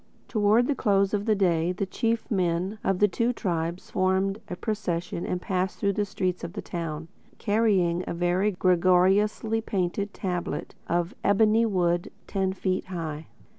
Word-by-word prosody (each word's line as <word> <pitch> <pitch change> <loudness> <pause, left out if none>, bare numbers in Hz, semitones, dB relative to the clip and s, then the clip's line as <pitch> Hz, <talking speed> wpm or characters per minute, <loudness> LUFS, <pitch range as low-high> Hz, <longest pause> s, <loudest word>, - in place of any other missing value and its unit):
Towards 215 +2 +3
the 290 - +2
close 200 -5 +2
of 205 +1 -1
the 215 - +4
day 175 -3 +2
the 190 +2 -2
chief 230 +5 -2
men 185 +1 0
of 195 -1 +1
the 210 - +5
two 230 +5 0
tribes 170 -4 -3
formed 190 +2 +1
a 180 - -3
procession 180 -5 -3
and 180 - -1
passed 185 0 -2
through 200 -1 +1
the 205 +1 0
streets 185 -2 -2
of 170 - -5
the 205 - -5
town, 165 -2 -5 0.3
carrying 200 -6 +2
a - - -2
very 175 +4 +1
gorgeously 190 +4 +3
painted 200 0 -2
tablet 175 -5 -3
of 175 +1 0
ebony 220 +3 +4
wood, 175 -4 0
ten 190 -1 -1
feet 185 -1 -2
high. 160 -4 -5
190 Hz, 160 wpm, -26 LUFS, 175-210 Hz, 0.3 s, the